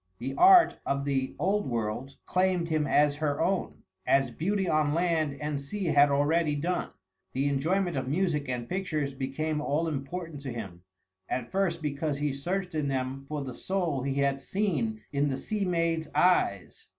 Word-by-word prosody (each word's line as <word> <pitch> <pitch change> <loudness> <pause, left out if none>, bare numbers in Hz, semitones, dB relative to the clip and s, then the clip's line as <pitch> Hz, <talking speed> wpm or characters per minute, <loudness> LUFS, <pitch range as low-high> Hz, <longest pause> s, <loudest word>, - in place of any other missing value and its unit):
The 130 +3 -4
art 365 -1 +7
of 140 0 -1
the 135 -2 -1
Old 195 +5 +1
World 120 +3 -3
claimed 185 -2 +1
him 155 -2 +1
as 145 +1 +3
her 145 -2 -1
own, 185 +3 -1 0.2
as 135 -2 +2
beauty 190 - -1
on 155 -2 +2
land 165 -4 +1
and 150 -1 -2
sea 195 +8 -4
had 145 -3 +5
already 150 +2 +2
done. 175 +5 -1 0.4
The 135 +2 +1
enjoyment 175 +6 0
of 130 -1 -2
music 150 -2 0
and 120 -1 -3
pictures 155 -5 -2
became 150 +3 -2
all 150 +3 0
important 155 +1 -5
to 135 -2 -5
him, 100 -7 -7 0.5
at 125 -2 -3
first 180 -4 0
because 145 0 -1
he 145 -1 -1
searched 180 +6 -3
in 150 -2 -1
them 135 0 -2
for 150 -1 -3
the 130 -2 -6
soul 175 -4 -1
he 135 +1 -2
had 140 -1 +1
seen 135 - -1
in 145 0 +1
the 135 - -2
sea 210 +6 -2
maid's 165 -3 0
eyes. 150 - +2
150 Hz, 175 wpm, -28 LUFS, 135-175 Hz, 0.5 s, art